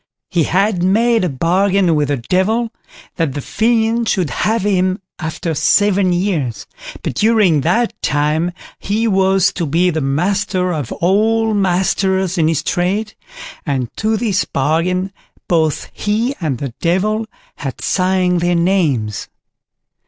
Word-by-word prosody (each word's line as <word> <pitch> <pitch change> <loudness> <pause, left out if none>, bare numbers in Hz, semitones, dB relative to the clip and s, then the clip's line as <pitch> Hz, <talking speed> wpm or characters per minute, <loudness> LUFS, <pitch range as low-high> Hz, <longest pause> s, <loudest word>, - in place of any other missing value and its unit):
He 170 -4 +2
had 195 +1 +1
made 225 +4 +2
a 180 - +1
bargain 180 +5 +2
with 150 -2 +1
the 145 0 0
Devil, 200 - 0 0.5
that 165 -6 0
the - - -2
fiend 225 - +1
should 175 -9 0
have 220 - 0
him 185 -2 +1 0.2
after 160 +1 -3
seven 200 +4 +3
years, 175 - -1 0.4
but - - -2
during 205 - +3
that 220 - +1
time 150 +4 0 0.3
he 220 +3 -1
was 190 -2 +2
to 170 - -2
be 175 +5 +2
the 160 -1 -2
master 180 +6 0
of 145 -7 -4
all 220 +5 +1
masters 190 -1 +1
in 155 - +3
his 160 -3 0
trade, 200 +5 -1 0.5
and 130 -6 -3
to 220 0 0
this 205 -4 0
bargain 175 +7 -1 0.3
both 160 -3 0
he 220 +5 -1
and 145 -6 -1
the 135 -1 -5
Devil 210 +6 0 0.3
had 135 -3 -5
signed 185 -1 +1
their 175 0 +1
names. 160 - 0
185 Hz, 135 wpm, -17 LUFS, 160-205 Hz, 0.5 s, seven